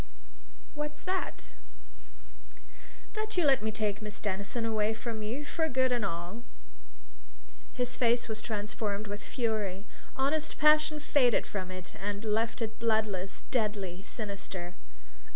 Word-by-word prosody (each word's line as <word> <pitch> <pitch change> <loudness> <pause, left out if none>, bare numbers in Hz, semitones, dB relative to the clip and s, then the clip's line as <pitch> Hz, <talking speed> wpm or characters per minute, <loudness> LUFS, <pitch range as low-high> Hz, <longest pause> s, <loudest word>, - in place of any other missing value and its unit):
"What's 295 0 -4
that?" 370 0 -2 1.6
"That 435 -2 -2
you 350 - +5
let 270 -5 +6
me 220 - 0
take 215 -1 -1
Miss 210 -1 -4
Denison 200 +3 -1
away 220 -1 +2
from 225 -1 -4
you, 240 +8 -2
for 320 +2 0
good 260 -1 +3
and 240 -3 +2
all!" 175 +4 -3 1.3
His 250 -1 -1
face 235 -1 +3
was 220 -1 -3
transformed 210 -1 -2
with 205 0 -5
fury: 215 -5 -1 0.3
honest 295 +4 +1
passion 305 0 +6
faded 265 -5 +4
from 185 -3 -3
it 185 0 -7
and 205 +2 -2
left 225 +2 +1
it 220 -1 -4
bloodless, 215 -4 +1
deadly, 205 -6 0
sinister. 195 -4 -5
220 Hz, 130 wpm, -32 LUFS, 205-255 Hz, 1.6 s, let